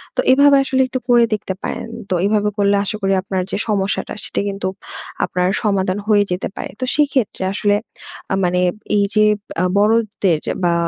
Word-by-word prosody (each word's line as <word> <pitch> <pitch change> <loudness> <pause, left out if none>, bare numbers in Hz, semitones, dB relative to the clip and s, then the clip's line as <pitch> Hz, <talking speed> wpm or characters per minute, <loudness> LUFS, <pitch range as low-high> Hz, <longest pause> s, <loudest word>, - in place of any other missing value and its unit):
তো - - -4
এভাবে 280 +1 +6
আসলে 265 -1 +1
একটু 255 0 -3
করে 240 -1 +6
দেখতে 195 -2 -2
পারেন। - - -4 0.2
তো 185 - +1
এভাবে 210 0 +2
করলে 200 0 +3
আশা 215 +2 -3
করি 195 0 +1
আপনার 190 -2 -2
যে - - -1
সমস্যাটা, 200 -1 -1
সেটা - - -2
কিন্তু 195 -1 -3 0.6
আপনার 180 0 -1 0.2
সমাধান 195 -2 +1
হয়ে 205 -2 +4
যেতে 180 +1 -1
পারে। - - -6
তো 255 - -1
সেক্ষেত্রে 275 -9 0
আসলে 205 0 +1 0.6
আ - - +3
মানে 180 0 +1 0.4
এইযে 215 +1 +2 0.4
আ - - +2
বড়দের 210 -5 +2
যা - - -1
বা, 175 -1 +3
205 Hz, 175 wpm, -19 LUFS, 195-230 Hz, 0.6 s, এভাবে